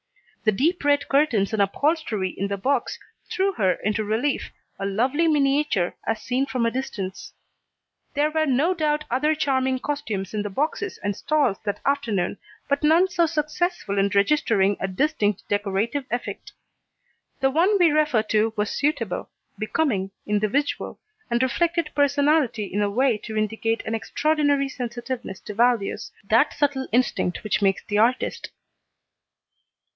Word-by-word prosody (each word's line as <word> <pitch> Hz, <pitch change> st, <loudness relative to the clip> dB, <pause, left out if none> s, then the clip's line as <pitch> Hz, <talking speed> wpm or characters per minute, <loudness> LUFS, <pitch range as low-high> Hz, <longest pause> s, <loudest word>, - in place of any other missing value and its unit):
The 215 Hz, -, +5 dB
deep 310 Hz, -, 0 dB
red 285 Hz, -1 st, +2 dB
curtains 260 Hz, -9 st, +2 dB
and 215 Hz, -, +2 dB
upholstery 215 Hz, -, 0 dB
in 200 Hz, -, -2 dB
the 200 Hz, 0 st, -3 dB
box 275 Hz, +8 st, 0 dB, 0.3 s
threw 390 Hz, +1 st, +1 dB
her 190 Hz, -, +2 dB
into 210 Hz, +4 st, -1 dB
relief, 225 Hz, +7 st, -1 dB, 0.3 s
a 195 Hz, -, -2 dB
lovely 255 Hz, +11 st, +1 dB
miniature, 280 Hz, -, +2 dB
as 225 Hz, -1 st, 0 dB
seen 260 Hz, +2 st, 0 dB
from 250 Hz, -4 st, -1 dB
a 230 Hz, -, +1 dB
distance. 205 Hz, -7 st, -5 dB, 0.8 s
There 295 Hz, +2 st, +2 dB
were 315 Hz, 0 st, +1 dB
no 285 Hz, +7 st, +2 dB
doubt 305 Hz, -3 st, 0 dB
other 300 Hz, +5 st, +2 dB
charming 265 Hz, -3 st, +1 dB
costumes 225 Hz, -9 st, -4 dB
in 210 Hz, -, -1 dB
the 205 Hz, -, -3 dB
boxes 310 Hz, -, -2 dB
and 205 Hz, -1 st, -1 dB
stalls 285 Hz, -9 st, +1 dB
that 205 Hz, -, -2 dB
afternoon, 225 Hz, -10 st, 0 dB, 0.3 s
but 280 Hz, 0 st, +1 dB
none 325 Hz, +5 st, +5 dB
so 345 Hz, -2 st, +2 dB
successful 305 Hz, -, -1 dB
in 195 Hz, +1 st, +3 dB
registering 200 Hz, -3 st, +3 dB
a 195 Hz, -, -1 dB
distinct 210 Hz, -, 0 dB
decorative 205 Hz, +7 st, -1 dB
effect. 240 Hz, +1 st, -5 dB, 0.9 s
The 270 Hz, 0 st, +2 dB
one 360 Hz, +8 st, +3 dB
we 345 Hz, -4 st, +5 dB
refer 300 Hz, -7 st, +2 dB
to 220 Hz, 0 st, +1 dB
was 210 Hz, 0 st, 0 dB
suitable, 230 Hz, -10 st, -1 dB, 0.3 s
becoming, 215 Hz, -4 st, 0 dB, 0.2 s
individual, 215 Hz, +7 st, -1 dB, 0.3 s
and 240 Hz, +1 st, +1 dB
reflected 335 Hz, +4 st, 0 dB
personality 285 Hz, -4 st, +2 dB
in 200 Hz, +1 st, -2 dB
a 205 Hz, -, +1 dB
way 240 Hz, +1 st, +2 dB
to 220 Hz, 0 st, -6 dB
indicate 225 Hz, +1 st, -1 dB
an 220 Hz, -, -3 dB
extraordinary 290 Hz, +3 st, +1 dB
sensitiveness 240 Hz, -4 st, -5 dB
to 210 Hz, -, -7 dB
values, 235 Hz, -1 st, +1 dB, 0.2 s
that 230 Hz, +8 st, +3 dB
subtle 280 Hz, -2 st, 0 dB
instinct 235 Hz, -6 st, 0 dB
which 215 Hz, -1 st, 0 dB
makes 195 Hz, -1 st, +2 dB
the 205 Hz, 0 st, 0 dB
artist. 245 Hz, +4 st, +1 dB
255 Hz, 150 wpm, -24 LUFS, 210-295 Hz, 0.9 s, The